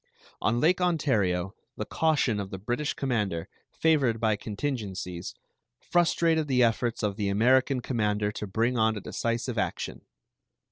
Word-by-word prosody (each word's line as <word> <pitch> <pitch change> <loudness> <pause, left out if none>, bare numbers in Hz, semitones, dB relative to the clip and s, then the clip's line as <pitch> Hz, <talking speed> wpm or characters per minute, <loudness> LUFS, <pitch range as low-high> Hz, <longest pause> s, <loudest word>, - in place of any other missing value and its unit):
On 115 +3 +1
Lake 180 +6 +3
Ontario 105 - +1 0.2
the - - -3
caution 145 -9 +1
of 100 -1 -4
the 95 - -6
British 120 +9 -2
commander, 105 -11 -1 0.2
favored 140 -8 +2
by 110 -1 +2
contingencies, 100 -6 -4 0.4
frustrated 165 -2 +2
the 125 -2 +3
efforts 115 0 0
of 105 -1 -1
the 100 -2 0
American 130 +5 +3
commander 105 -4 0
to 105 - -5
bring 115 +5 0
on 110 0 +2
a - - -5
decisive 115 +2 -2
action. - - -3
115 Hz, 140 wpm, -28 LUFS, 105-135 Hz, 0.4 s, Lake